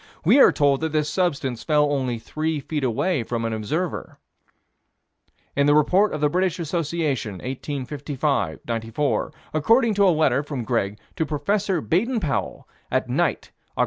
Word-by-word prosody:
We 225 - +6
are - - +8
told 140 -2 +2
that 160 -1 -2
this 150 -1 +1
substance 140 -9 -1
fell 150 -2 +2
only 130 -4 -1
three 155 +6 -3
feet 145 +1 -4
away 130 +6 0
from 115 0 -3
an 115 - -1
observer. 150 - -3 1.4
In 140 0 +3
the 145 - +5
Report 185 +8 +4
of 155 - -4
the 150 - +4
British 180 +2 0
Association, 155 - -2
1855 135 - -3
94, 115 +5 -1 0.2
according 225 - +3
to 200 -1 +4
a - - +6
letter 155 -5 +3
from 140 -4 -5
Greg 105 -4 -1 0.2
to 160 - +1
Prof. 145 -1 -4 0.4
Baden 230 +8 +1
Powell, 150 -9 -3 0.2
at - - 0
night, - - 0 0.3
Oct. - - -7
145 Hz, 155 wpm, -23 LUFS, 130-165 Hz, 1.4 s, are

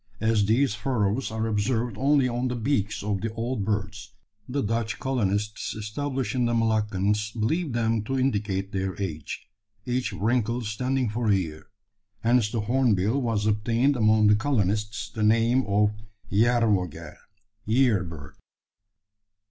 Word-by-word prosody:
As 110 -2 +2
these 115 +2 +3
furrows 110 +1 -1
are 110 0 -2
observed 115 +1 0
only 135 +2 +3
on 125 +1 -1
the 125 - -2
beaks 110 -5 -1
of 100 -2 -1
the 115 - -2
old 115 -1 -2
birds, 100 0 -3 0.3
the 140 +2 -1
Dutch 115 +1 -1
colonists 105 -5 -1
established 125 +3 -3
in 125 -2 +1
the 120 0 +1
Moluccas 105 -2 +1
believe 155 +6 0
them 115 -2 +1
to 135 +3 -1
indicate 105 -6 -1
their 95 -2 -3
age, 80 -7 -5 0.4
each 125 -3 -1
wrinkle 115 +3 0
standing 125 +4 -1
for 115 +2 -2
a 100 - +5
year. 80 -5 -4 0.5
Hence 115 -1 +3
the 115 -1 -2
hornbill 120 +1 +1
has 105 -2 0
obtained 115 +6 +2
among 110 -2 +4
the 105 0 +6
colonists 105 -3 -1
the 110 - -5
name 115 +4 +3
of 105 +1 +3 0.4
Yerrvogel 110 -5 +1 0.5
(year 115 -4 +3
bird). 75 -4 -9
110 Hz, 140 wpm, -26 LUFS, 105-125 Hz, 0.5 s, the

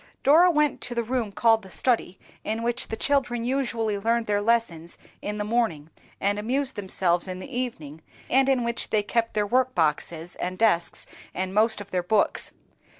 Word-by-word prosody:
Dora 325 +6 +6
went 300 -3 +1
to 240 - -3
the 235 - 0
room 235 -2 -2
called 225 +2 +3
the 190 - -13
study, 220 -3 0 0.3
in 220 +2 -2
which 240 +1 -1
the - - -4
children 245 -3 0
usually 235 -5 -1
learned 230 +2 +1
their 205 -1 +1
lessons 205 -7 0 0.2
in 210 0 -4
the 210 - -1
morning, 205 -9 -1 0.3
and 205 +1 0
amused 260 +5 -1
themselves 185 -3 0
in 185 -1 -5
the 240 +8 -8
evening, 160 - -4 0.3
and 270 +1 +3
in 260 -3 +2
which 235 0 -2
they 215 -1 +2
kept 230 +2 -1
their 210 -1 +2
workboxes 175 - 0
and 185 +1 -3
desks, 175 -6 +1 0.3
and 185 +1 -2
most 220 +2 +3
of 205 - -11
their 180 - 0
books. 205 +4 +1
220 Hz, 180 wpm, -25 LUFS, 190-240 Hz, 0.3 s, Dora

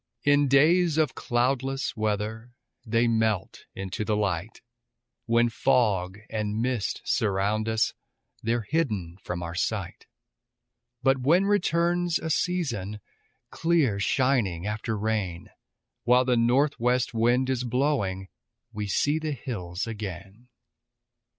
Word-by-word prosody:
In 145 0 +4
days 160 +4 +4
of 155 -4 +2
cloudless 135 +3 -1
weather 110 +2 -3 0.3
They 115 +2 +2
melt 110 -4 0
into 95 +2 -4
the 105 0 0
light; 100 -1 -2 0.7
When 120 +1 +4
fog 100 -6 +1
and 105 -1 -2
mist 120 -3 -1
surround 105 +1 0
us 110 0 +1 0.5
They're 115 +1 0
hidden 105 - -1
from 90 -1 -4
our 85 0 -5
sight; 85 - -3 1.0
But 135 0 +3
when 165 +9 +3
returns 175 -3 +1
a 160 - -4
season 125 - -1 0.5
Clear 160 -11 +1
shining 105 -7 +1
after 105 +1 -2
rain, 100 -5 -2 0.5
While 125 +1 +4
the 125 -1 +2
northwest 125 0 +2
wind 120 +3 +2
is 125 -1 -1
blowing, 120 -7 0 0.5
We 105 -1 -3
see 145 +9 +1
the 155 -1 -2
hills 95 -10 -5
again. 105 0 -7
115 Hz, 115 wpm, -26 LUFS, 105-135 Hz, 1.0 s, In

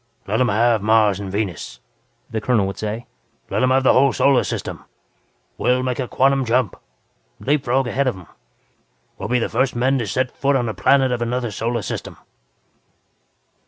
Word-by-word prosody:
"Let 110 +5 0
'em 125 - +3
have 115 0 +2
Mars 105 -2 +3
and 100 -2 -6
Venus," 100 -5 -4 0.5
the 110 - -4
colonel 115 -6 +2
would 95 - -5
say 110 +3 -4 0.5
"Let - - 0
'em 130 - +3
have 130 +1 +3
the - - +5
whole 135 +2 +5
damn 135 - -1
Solar 140 -2 +3
System! - - -5 0.8
We'll 125 +1 +2
make 130 0 -2
a 130 - -2
quantum 135 +2 +2
jump 120 -4 +1 0.6
leap 140 0 0
frog 130 +2 +1
ahead 135 +3 0
of 125 - -1
'em. 90 - -12 0.9
We'll - - -5
be 125 - +2
the 120 - 0
first 130 +3 0
men 130 +3 +1
to 115 - -3
set 130 +6 -1
foot 140 0 +1
on 125 -3 0
a 110 - -2
planet 130 +7 +3
of 120 -1 -2
another 120 0 -2
solar 115 +2 -2
system." - - -6
125 Hz, 190 wpm, -21 LUFS, 110-130 Hz, 0.9 s, the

